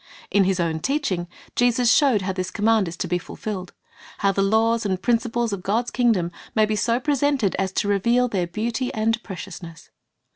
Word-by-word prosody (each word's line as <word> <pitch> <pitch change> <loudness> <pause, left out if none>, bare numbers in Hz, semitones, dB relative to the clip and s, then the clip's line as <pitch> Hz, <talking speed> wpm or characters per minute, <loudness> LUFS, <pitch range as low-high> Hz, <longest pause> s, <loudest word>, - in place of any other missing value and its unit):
^ - - -29 0.3
In 200 -2 +4
His 190 -1 +1
own 165 -2 0
teaching, 205 - -1 0.3
Jesus 245 -1 +3
showed 260 -10 +3
how 190 0 -2
this 185 -1 -3
command 220 -1 +2
is 165 +1 -6
to 180 - -2
be 175 +1 0
fulfilled, 185 0 -6 0.3
— - - -19
how 200 - +2
the 195 - 0
laws 225 +3 +2
and 190 -3 -1
principles 235 0 0
of 195 - -4
God's 225 +6 -1
kingdom 220 -9 +1 0.3
can 215 0 +5
be 215 - 0
so 230 +4 +1
presented 280 -6 +1
as 190 -1 0
to 200 - 0
reveal 235 +5 +2
their 190 -7 -1
beauty 230 +7 -2
and 225 +1 +1
precious 190 -3 -8
ness. 165 -1 -12
215 Hz, 205 wpm, -23 LUFS, 185-235 Hz, 0.3 s, can